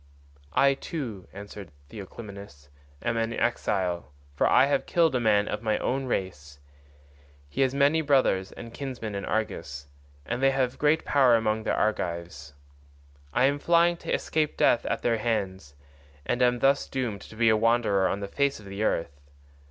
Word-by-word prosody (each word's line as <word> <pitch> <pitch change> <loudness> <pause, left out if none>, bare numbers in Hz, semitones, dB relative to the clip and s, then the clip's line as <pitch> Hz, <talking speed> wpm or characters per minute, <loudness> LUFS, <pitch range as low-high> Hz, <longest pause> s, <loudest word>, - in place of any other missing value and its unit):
"I 140 0 +5
too," 130 - -6
answered 100 -2 -9 0.2
Theoclymenus, 100 -7 -10 0.3
"am 120 -1 0
an 115 0 -1
exile, 95 -8 -1 0.2
for 70 - +2
I 130 - +5
have 145 - 0
killed 165 -3 +3
a 125 - +1
man 105 -3 +3
of - - -3
my 110 -2 0
own 135 +1 -1
race. 75 - -4 0.9
He 70 - -3
has 135 0 +2
many 145 +3 +3
brothers 130 -10 +2
and 115 -1 -10
kinsmen 125 -6 -5
in 100 -1 -4
Argos, 75 -10 -3 0.4
and 125 - -3
they 135 - +5
have 130 -2 -1
great 150 +2 +2
power 130 -4 +4
among 110 -1 0
the - - +1
Argives. 85 -8 -3 0.8
I 125 - +3
am 140 +1 +1
flying 170 +2 +3
to - - -6
escape 155 -1 -1
death 120 - +3
at - - -2
their 115 -2 +1
hands, 95 -10 -3 0.5
and 120 - -1
am 125 0 +4
thus 135 +3 +2
doomed 120 -7 -3
to - - -12
be 115 0 +3
a 110 - +5
wanderer 110 -4 +2
on 100 - -2
the 100 - -4
face 140 +5 0
of 105 - -14
the 100 +1 -6
earth. 75 -9 -1
115 Hz, 170 wpm, -27 LUFS, 95-135 Hz, 0.9 s, I